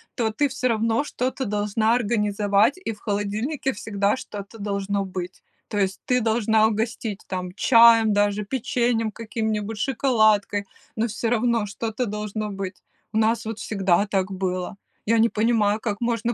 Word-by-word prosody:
то 225 -2 0
ты 285 +7 +1
всё 255 -1 -1
равно 225 +2 +1
что-то 260 -2 -3
должна 210 +2 +1
организовать, 210 - +2
и 370 -12 -4
в 210 - -16
холодильнике 215 +7 -2
всегда 205 -2 0
что-то 210 -4 -8
должно 200 -1 -2
быть." 185 -1 -6 0.2
То 210 - -4
есть 195 -1 0
ты 250 -1 +2
должна 220 -1 +3
угостить 220 -1 -3
там 180 -1 -4
чаем 230 -2 +6
даже, 205 0 +1
печеньем 235 -1 0
каким-нибудь, 220 -1 -3
шоколадкой, 215 -5 +2 0.3
но 225 +1 0
всё 225 +1 -2
равно 235 -1 +1
что-то 225 +4 -3
должно 210 0 -4
быть. 195 -1 -6 0.3
У - - 0
нас 225 +1 +2
вот 220 0 -5
всегда 195 -1 +1
так 195 -1 -1
было. 185 -1 -3 0.3
Я 230 +1 +3
не 230 +1 +4
понимаю, 215 -2 +2
как 210 -2 -2
можно 235 0 0
215 Hz, 155 wpm, -24 LUFS, 205-230 Hz, 0.3 s, чаем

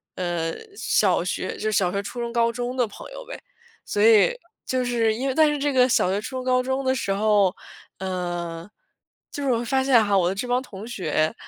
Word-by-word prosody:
呃， 175 -2 -2 0.2
小 - - +2
学 - - -3
就 215 - -2
小 185 -4 +2
学、 200 +1 -1
初 220 +5 -7
中、 235 0 -3
高 235 -1 +2
中 245 +1 -4
的 245 -3 +2
朋 205 - -11
友 - - -9
呗。 - - -7 0.5
所 205 - -1
以 225 - +6 0.3
就 255 -1 0
是 230 -2 +1
因 250 +5 -3
为 265 - -1
但 315 -1 +5
是 295 - -1
这 290 +1 0
个 255 -1 +5
小 185 - +3
学、 195 - 0
初 260 +4 -6
中、 255 - -4
高 255 0 +2
中 265 +1 -1
的 260 0 +1
时 200 - -2
候 205 -2 +2 0.4
嗯， 175 -2 -4 0.6
就 285 - -5
是 270 - +1
我 235 -1 0
发 265 +3 +1
现 250 -4 +5
哈， 200 -1 +2
我 175 -2 +2
的 - - -1
这 230 +5 -3
帮 245 +1 +1
同 215 -3 -10
学， 160 -8 -1
230 Hz, 240 characters per minute, -24 LUFS, 190-255 Hz, 0.6 s, 以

